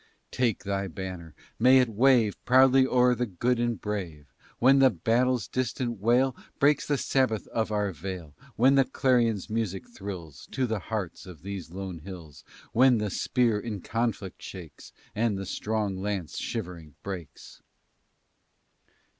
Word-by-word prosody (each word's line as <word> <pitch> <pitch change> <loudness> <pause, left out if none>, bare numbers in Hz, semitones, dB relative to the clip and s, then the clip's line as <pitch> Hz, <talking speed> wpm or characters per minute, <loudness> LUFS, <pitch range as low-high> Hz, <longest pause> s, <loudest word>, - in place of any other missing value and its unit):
"Take 120 -4 0
thy 100 0 -2
banner! 90 -2 -7 0.2
May 130 +3 +7
it 125 -1 +4
wave 115 -1 +3
Proudly 130 +1 +5
o'er 125 -1 +4
the 125 0 -1
good 120 +6 0
and 120 -4 0
brave; 85 - -5 0.2
When 135 +3 +5
the 135 -1 +7
battle's 120 +4 +1
distant 125 -2 -2
wail 125 +5 +2 0.2
Breaks 145 +1 +3
the 145 - +1
sabbath 130 -6 0
of 110 -1 -1
our 105 -2 0
vale, 85 -2 -7 0.2
When 130 +4 +5
the 135 -1 +5
clarion's 120 -7 +1
music 110 -4 -2
thrills 90 -8 -8
To 130 -1 +1
the 110 -3 -2
hearts 95 -3 -5
of 85 -4 -12
these 100 -3 -6
lone 95 -1 -6
hills, 80 -3 -11 0.3
When 125 +1 +5
the 105 -2 -2
spear 115 -1 +1
in 105 -4 -5
conflict 115 -4 -3
shakes, 85 -6 -10 0.2
And 110 -1 0
the 95 - -5
strong 105 0 -2
lance 100 -5 -3
shivering 85 -5 -6
breaks. 90 -6 -8
105 Hz, 145 wpm, -27 LUFS, 95-125 Hz, 0.3 s, May